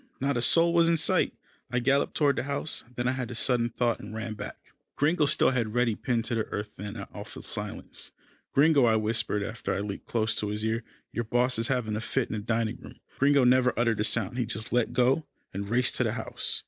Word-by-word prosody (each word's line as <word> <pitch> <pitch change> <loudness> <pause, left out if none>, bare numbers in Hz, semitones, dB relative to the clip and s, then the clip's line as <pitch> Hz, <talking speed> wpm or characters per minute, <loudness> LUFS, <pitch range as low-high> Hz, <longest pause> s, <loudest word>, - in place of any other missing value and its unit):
Not 140 0 0
a 120 - 0
soul 170 +6 +4
was 170 -1 +5
in 165 - +3
sight. - - +2 0.4
I 125 - -1
galloped 140 +3 +2
toward 145 -3 +3
the - - -1
house, 140 +2 -3
then 120 0 -1
I - - +3
had 130 -2 -3
a 120 - -6
sudden 120 0 +2
thought, 120 0 0
and 110 - -8
ran 110 0 -4
back. 105 - -9 0.2
Gringo 150 +1 +2
still 140 - +4
had 115 -4 -1
Reddy 120 -2 +3
pinned 115 +1 -1
to 120 - -2
the 110 -2 0
earth 105 -1 -6
in 105 +1 -6
that 100 -3 -7
awful 105 +2 -7
silence. 105 -2 -5 0.4
"Gringo," 145 -2 +5
I 110 -1 +4
whispered, 110 -1 0
after 115 +3 -3
I - - -1
had 100 +2 -2
leaped 100 -1 -6
close 115 -1 0
to 105 - -1
his 105 +1 -3
ear, 115 +1 -1 0.3
"your 120 - -2
boss 125 +1 +2
is 115 - +2
having 125 -6 -1
a 110 - -2
fit 130 +2 -1
in - - -2
the 110 - -2
dining 115 +1 -1
room." - - -12 0.2
Gringo 140 0 +5
never 125 0 +4
uttered 115 -2 +1
a - - +2
sound. 120 +2 +1
He 120 - 0
just 110 +5 -3
let 120 -1 +2
go, 130 +5 +2 0.3
and 100 +1 -4
raced 125 +2 +2
to - - +2
the - - 0
house. - - -2
120 Hz, 240 wpm, -28 LUFS, 110-130 Hz, 0.4 s, was